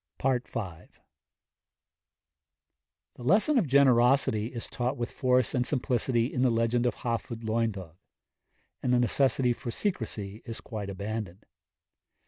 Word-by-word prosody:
V. 135 - +1 0.2
The 90 -8 -6 2.3
lesson 215 - +4
of 185 - 0
generosity 125 -4 +4
is 120 -1 -7
taught 125 +3 -2
with 120 0 -3
force 125 -2 +2
and 125 - +2
simplicity 125 -3 0
in 125 - 0
the 130 - +4
legend 115 +1 +1
of 120 - -1
Hafod 115 -1 -4
Lwyddog, 110 -7 -2 0.8
and 125 - 0
the 125 - +4
necessity 125 +1 +2
for 120 - -7
secrecy 110 - -3
is 115 -2 -7
quite 105 -3 -6
abandoned. 100 -1 -5
120 Hz, 120 wpm, -28 LUFS, 110-130 Hz, 2.3 s, lesson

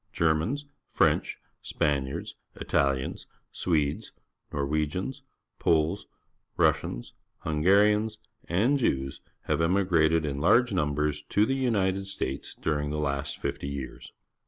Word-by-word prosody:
Germans, 85 - +1 0.2
French, - - +2 0.2
Span 70 -3 0
iards, 65 - -5 0.2
Italians, 70 -1 0 0.2
Swedes, 75 -5 -1 0.4
Nor 70 - -2
The - - +1
Capitol, - - -6
wegians, 80 - -1 0.4
Poles, 80 +5 +1 0.5
Russians, - - +1 0.3
Hungarians, 105 +7 +3 0.3
and 115 +11 +2
Jews 70 - -1 0.2
have 75 +1 0
emigrated 80 -3 +3
in 70 -1 -2
large 120 +9 +4
nmnbers 75 -4 0
to 105 - +3
the 135 - 0
United 100 -7 0
States 70 -8 -4
during 75 -2 -1
the 75 - -2
last 70 -2 -2
fifty - - -3
years. 70 -2 -6
80 Hz, 120 wpm, -28 LUFS, 70-100 Hz, 0.5 s, large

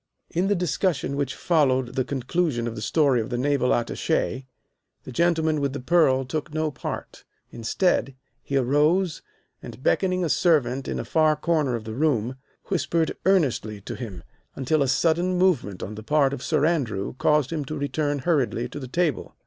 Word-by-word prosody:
In 180 +3 0
the 205 - +2
discussion 175 -4 0
which 140 -2 -2
followed 130 -7 +2
the 130 - 0
conclusion 135 0 -1
of 120 - -3
the 110 - -7
story 135 +1 +2
of 110 - -5
the 120 - -2
Naval 135 0 +1
Attache 130 +2 -1 0.6
the - - -9
gentleman 160 +1 +1
with 140 -1 -1
the 145 - -4
pearl 135 -2 +3
took 150 +4 -4
no 155 0 -1
part. 135 - -7 0.3
Instead, 135 - 0 0.3
he 140 - -2
arose, 150 +7 +2 0.4
and, 130 - -10
beckoning 185 +1 +1
a - - 0
servant 135 -6 +2
to - - -3
a - - -4
far 155 -1 +3
corner 150 -5 0
of 115 - -5
the 110 0 -6
room, 130 -3 0 0.3
whispered 170 -3 0
earnestly 135 - +1
to - - -6
him 100 -9 -7 0.3
until 140 +3 +1
a 135 - +2
sudden 170 +6 +2
movement 150 - +1
on 105 - -5
the 110 - -8
part 140 +4 +2
of 140 - -5
Sir 150 0 +1
Andrew 130 - -1
caused 150 -2 +2
him 155 -3 -2
to 155 +2 -5
return 145 +1 -1
hurriedly 135 -7 +1
to 145 - -7
the 130 - -7
table. 155 -1 -1
145 Hz, 180 wpm, -25 LUFS, 125-160 Hz, 0.6 s, pearl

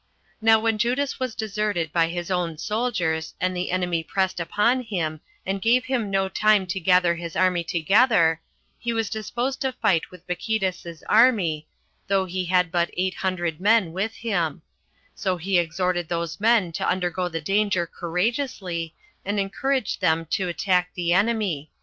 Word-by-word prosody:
Now 220 0 +6
when 225 -1 0
Judas 255 +5 0
was 255 -3 -3
deserted 205 -7 -2
by 165 -1 +3
his 175 +2 -4
own 175 -3 -1
soldiers, 180 -7 -1
and 185 0 0
the 180 0 -2
enemy 180 -2 0
pressed 190 +2 -1
upon 210 +9 +1
him, 165 -9 -3 0.2
and 195 0 -2
gave 245 +4 +3
him 245 -6 -1
no 195 0 +1
time 210 0 +3
to 195 - -3
gather 180 -1 +4
his 170 -1 -7
army 180 -2 +2
together, 170 - +3 0.4
he 235 0 -2
was 225 -2 -1
disposed 240 +5 -3
to 265 -2 0
fight 185 -9 +1
with 180 -1 -15
Bacchides's 180 -3 -3
army, 200 -10 +3 0.4
though 195 -1 +2
he 185 0 -3
had 180 -1 +2
but 175 -1 +1
eight 185 +1 0
hundred 175 -4 -2
men 205 -5 +3
with 205 +5 -2
him; 175 -8 -2 0.5
so 185 -3 -1
he 180 +2 +1
exhorted 175 0 -1
these 170 0 -3
men 215 -5 +3
to 165 - -2
undergo 180 0 -1
the 165 -1 -3
danger 195 +1 +1
courageously, 180 - -3 0.3
and 205 +1 -1
encouraged 255 +5 -1
them 165 +1 +2
to 190 - 0
attack 180 0 +1
the 175 -1 +1
enemy. 195 -7 0
185 Hz, 160 wpm, -24 LUFS, 170-215 Hz, 0.5 s, Now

